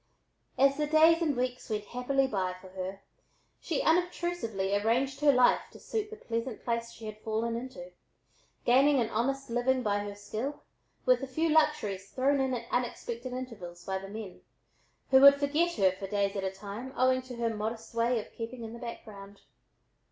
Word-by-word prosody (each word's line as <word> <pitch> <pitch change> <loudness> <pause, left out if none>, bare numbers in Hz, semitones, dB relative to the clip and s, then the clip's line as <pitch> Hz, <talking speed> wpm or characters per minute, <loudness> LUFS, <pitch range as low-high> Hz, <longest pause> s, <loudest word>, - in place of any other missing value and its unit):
As 275 +2 +4
the 300 0 0
days 320 +2 +5
and 300 -6 +1
weeks 250 0 -2
went 215 -1 -1
happily 250 +4 0
by 190 -7 -1
for 190 - -13
her, 190 +1 -6 0.6
she 325 - -2
unobtrusively 330 - 0
arranged 245 +6 +1
her 295 -1 +6
life 250 -2 +5
to - - -12
suit 430 -2 -3
the 440 - -8
pleasant 230 - -4
place 235 -1 -1
she 225 - -11
had 215 0 -7
fallen 225 +1 -2
into, 235 -7 -7 0.7
gaining 270 +3 +5
an 230 -2 0
honest 270 +3 -1
living 250 +2 +1
by 205 -1 +1
her 205 0 -5
skill, 220 +7 -5 0.4
with 255 0 +4
a 270 - -4
few 320 +5 0
luxuries 260 -11 +1
thrown 275 +1 +2
in 260 -1 0
at 235 -1 -5
unexpected 245 0 -2
intervals 210 -9 -7
by 190 0 -2
the 195 0 -9
men, 210 -3 -8 0.7
who 265 0 +7
would 280 0 +10
forget 300 +5 +1
her 190 -2 +4
for 195 +1 -7
days 200 0 0
at 195 - -2
a 190 - 0
time, 205 +6 -7
owing 255 0 +3
to 255 -1 -9
her 230 -1 -1
modest 220 +2 -4
way 235 +1 +2
of 210 - -9
keeping 230 +1 -6
in 225 0 -7
the 235 - -8
background. 205 -4 -9
240 Hz, 185 wpm, -30 LUFS, 205-270 Hz, 0.7 s, would